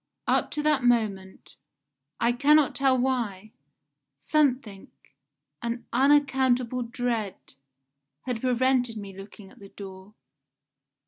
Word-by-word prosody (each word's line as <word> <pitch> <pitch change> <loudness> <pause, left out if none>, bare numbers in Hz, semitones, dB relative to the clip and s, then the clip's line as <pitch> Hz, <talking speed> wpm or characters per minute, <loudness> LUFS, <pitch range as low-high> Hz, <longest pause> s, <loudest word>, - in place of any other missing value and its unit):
Up - - +1
to 300 - -1
that 300 -4 +2
moment 210 -6 -1 0.6
I 235 +1 +2
cannot 290 +3 +4
tell 270 -1 +2
why 230 -6 -2 0.7
something 250 - 0 0.7
an 235 0 -4
unaccountable 260 -2 +2
dread 235 -4 -2 0.9
had 245 -3 -4
prevented 250 -2 +1
me 200 -2 -8
looking 195 0 -12
at - - -19
the 200 -1 -13
door. 195 +1 -11
240 Hz, 105 wpm, -26 LUFS, 205-260 Hz, 0.9 s, cannot